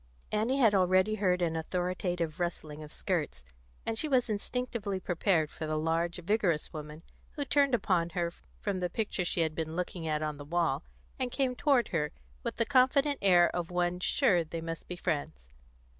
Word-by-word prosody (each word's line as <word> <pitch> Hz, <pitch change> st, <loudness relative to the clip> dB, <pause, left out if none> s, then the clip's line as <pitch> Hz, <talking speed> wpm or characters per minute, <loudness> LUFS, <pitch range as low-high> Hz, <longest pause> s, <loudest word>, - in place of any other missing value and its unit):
Annie 225 Hz, +6 st, +1 dB
had 230 Hz, -6 st, +5 dB
already 185 Hz, +2 st, +4 dB
heard 185 Hz, -4 st, +1 dB
an 165 Hz, -1 st, 0 dB
authoritative 175 Hz, -1 st, -2 dB
rustling 155 Hz, -3 st, -3 dB
of 150 Hz, -1 st, -9 dB
skirts, 155 Hz, -, -2 dB, 0.4 s
and 225 Hz, -1 st, -1 dB
she 310 Hz, -, +2 dB
was 250 Hz, -5 st, +2 dB
instinctively 210 Hz, -2 st, -2 dB
prepared 175 Hz, -3 st, +1 dB
for 155 Hz, -, -5 dB
the 155 Hz, 0 st, -1 dB
large, 165 Hz, +2 st, 0 dB
vigorous 180 Hz, -5 st, +1 dB
woman 150 Hz, +1 st, -8 dB, 0.3 s
who 285 Hz, -, -3 dB
turned 280 Hz, -2 st, +3 dB
upon 175 Hz, -5 st, +1 dB
her 170 Hz, 0 st, -1 dB, 0.3 s
from 200 Hz, -3 st, -1 dB
the 180 Hz, -1 st, -1 dB
picture 210 Hz, -1 st, -1 dB
she 175 Hz, 0 st, 0 dB
had 160 Hz, -1 st, +1 dB
been 160 Hz, 0 st, -3 dB
looking 175 Hz, -2 st, -3 dB
at 155 Hz, 0 st, 0 dB
on 150 Hz, -1 st, -2 dB
the 145 Hz, -, -8 dB
wall, 160 Hz, -1 st, 0 dB, 0.4 s
and 255 Hz, -1 st, 0 dB
came 260 Hz, -1 st, 0 dB
toward 270 Hz, -3 st, +3 dB
her 150 Hz, -3 st, 0 dB, 0.3 s
with -, -, -3 dB
the 230 Hz, -, +1 dB
confident 275 Hz, +2 st, +3 dB
air 175 Hz, -3 st, +5 dB
of 175 Hz, -2 st, -2 dB
one 180 Hz, 0 st, 0 dB
sure 185 Hz, -, +3 dB
they 165 Hz, +1 st, -5 dB
must 165 Hz, 0 st, -6 dB
be 180 Hz, -, -5 dB
friends. 155 Hz, -, -3 dB
180 Hz, 185 wpm, -31 LUFS, 160-215 Hz, 0.4 s, had